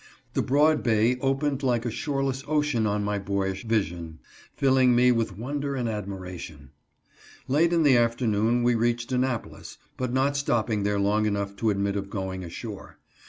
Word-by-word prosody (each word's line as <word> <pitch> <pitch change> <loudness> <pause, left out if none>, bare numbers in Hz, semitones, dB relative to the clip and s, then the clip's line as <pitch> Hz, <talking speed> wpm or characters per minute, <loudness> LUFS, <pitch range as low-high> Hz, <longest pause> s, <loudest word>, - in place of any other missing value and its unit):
The - - +1
broad 150 +3 +3
bay 115 +1 +2
opened 135 +1 0
like 120 -3 0
a 120 - -1
shoreless 135 0 -2
ocean 145 -7 +1
on 105 0 0
my 105 0 -1
boyish 95 +1 -2
vision, 85 -7 -2 0.4
filling 130 -2 +4
me 125 +1 +5
with 115 -5 -1
wonder 140 +4 -3
and 125 -3 -2
admiration. 95 - -6 0.8
Late 160 +5 +3
in 170 -2 +3
the 135 -4 +5
afternoon 115 0 +1
we 120 0 +3
reached 120 +1 0
Annapolis, 125 -2 -3 0.2
but 125 -1 -2
not 135 +2 +1
stopping 115 -6 0
there 100 0 0
long 105 +2 +2
enough 100 -1 -2
to 115 - +1
admit 100 -1 0
of 100 -1 -3
going 95 -2 -4
ashore. 85 - -8
115 Hz, 165 wpm, -26 LUFS, 100-130 Hz, 0.8 s, me